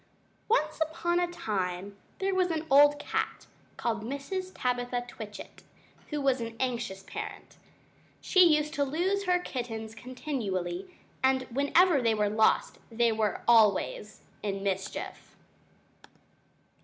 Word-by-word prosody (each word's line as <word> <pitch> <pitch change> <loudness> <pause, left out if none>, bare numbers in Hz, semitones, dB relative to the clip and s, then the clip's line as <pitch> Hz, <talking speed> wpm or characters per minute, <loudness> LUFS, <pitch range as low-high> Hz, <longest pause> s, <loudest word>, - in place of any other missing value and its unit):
] - - -38
Once 310 -10 +1
upon 340 +2 0
a 355 - +1
time 195 - -3 0.2
there 390 0 0
was 370 -1 +2
an 320 -1 -2
old 290 +1 +7
cat, 445 +9 -3 0.3
called 225 -2 -1
Mrs. 280 - -4
Tabitha 245 -1 -1
Twitchit, 215 -4 -9 0.5
who 300 - -2
was 270 -3 +1
an 230 0 -5
anxious 235 -7 -2
parent. - - -8 0.6
She 370 - +5
used 305 -2 +3
to 285 -2 +1
lose 365 +8 0
her 360 -1 +3
kittens 230 -9 -5
continually, 210 - -4 0.3
and 260 0 +3
whenever 285 +4 +4
they 230 -2 +2
were 210 -1 +1
lost 215 +1 +2
they 230 0 +3
were 215 -2 0
always 215 -2 +3 0.2
in 195 -2 -3
mischief! 195 -1 -4
250 Hz, 130 wpm, -29 LUFS, 215-310 Hz, 0.6 s, old